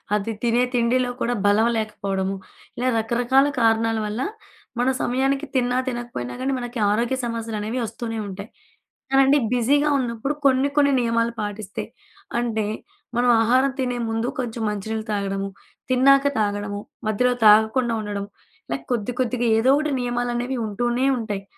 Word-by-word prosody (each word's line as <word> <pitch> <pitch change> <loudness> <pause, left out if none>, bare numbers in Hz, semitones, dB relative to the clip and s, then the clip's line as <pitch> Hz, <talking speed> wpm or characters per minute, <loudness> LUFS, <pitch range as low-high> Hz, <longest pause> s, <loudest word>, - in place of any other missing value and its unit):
అది 210 +2 -1
తినే 240 +1 +3
తిండిలో 245 +1 +2
కూడా 240 - +1
బలం 210 +3 +4
లేకపోవడము. 195 -3 -2 0.4
ఇలా 250 +2 0
రకరకాల 245 +5 +2
కారణాల 225 -1 +2
వల్ల 210 +4 -3 0.6
మనం 255 +2 +2
సమయానికి 270 +3 0
తిన్నా 245 -1 +2
తినకపోయినా 240 - -4
గానీ, 270 +1 0
మనకి 245 0 -5
ఆరోగ్య 235 +5 +1
సమస్యలనేవి 225 0 -3
ఒస్తూనే 225 0 -5
ఉంటాయి. 200 +2 -7 0.6
కానండి 270 +1 +5
బిజీగా 280 +5 +3
ఉన్నప్పుడు. 245 +2 -2
కొన్ని, 265 +1 +4
కొన్ని 280 -1 +4
నియమాలు 230 0 +1
పాటిస్తే 205 -1 -4 0.5
అంటే 225 -3 -1 0.5
మనం 245 0 +3
ఆహారం 255 +4 +3
తినే 250 -2 -1
ముందు 225 +2 -1
కొంచెం 235 -2 -4
మంచి 205 -1 -5
నీళ్లు 220 0 -3
తాగడము, 195 -1 -2 0.4
తిన్నాక 275 +2 +5
తాగడము 205 -1 -1 0.3
మధ్యలో 250 +4 +2
తాగకుండా 220 +3 +5
ఉండడం. 205 -1 -4 0.5
లైక్ - - -3
కొద్ది, 235 0 -1
కొద్దిగా 250 -1 0
ఏదో 230 +4 +3
ఒకటి 305 0 0
నియమాలనేవి 245 +1 -2
ఉంటూనే 240 +5 0
ఉంటాయి. 210 -4 -4
235 Hz, 135 wpm, -23 LUFS, 215-250 Hz, 0.6 s, కానండి